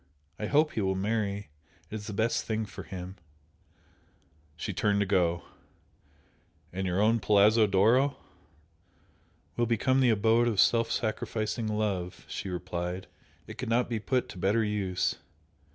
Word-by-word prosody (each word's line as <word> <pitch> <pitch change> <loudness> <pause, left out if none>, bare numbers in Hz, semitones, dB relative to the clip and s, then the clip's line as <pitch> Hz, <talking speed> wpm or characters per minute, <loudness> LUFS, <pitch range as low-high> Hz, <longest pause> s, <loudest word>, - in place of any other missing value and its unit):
I 105 - -2
hope 150 +4 +3
he 110 - -2
will 95 -1 0
marry 100 -1 -2 0.4
it - - -9
is 105 -1 -6
the 105 - -5
best 110 +3 0
thing 110 0 -2
for 100 - -9
him!" 95 +1 -8 1.4
She 100 +5 -4
turned 100 +1 +1
to - - +2
go. 85 -3 +1 1.3
"And 95 +1 -2
your 90 +1 0
own 110 +3 +3
Palazzo 105 +2 +5
d'Oro? 120 +8 +3 0.7
" 85 - -37
"Will 120 0 +2
become 120 +4 +2
the 130 -2 +4
abode 115 +2 +3
of 110 -5 0
self 115 +2 +4
sacrificing 110 0 -2
love," 105 -4 -2
she 100 - -5
replied 90 0 -4 0.4
"It - - -11
could - - -3
not 120 +2 +2
be 115 -2 -1
put 125 +4 0
to 95 - -9
better 105 +5 +2
use! 100 -4 -1
105 Hz, 150 wpm, -29 LUFS, 95-115 Hz, 1.4 s, Palazzo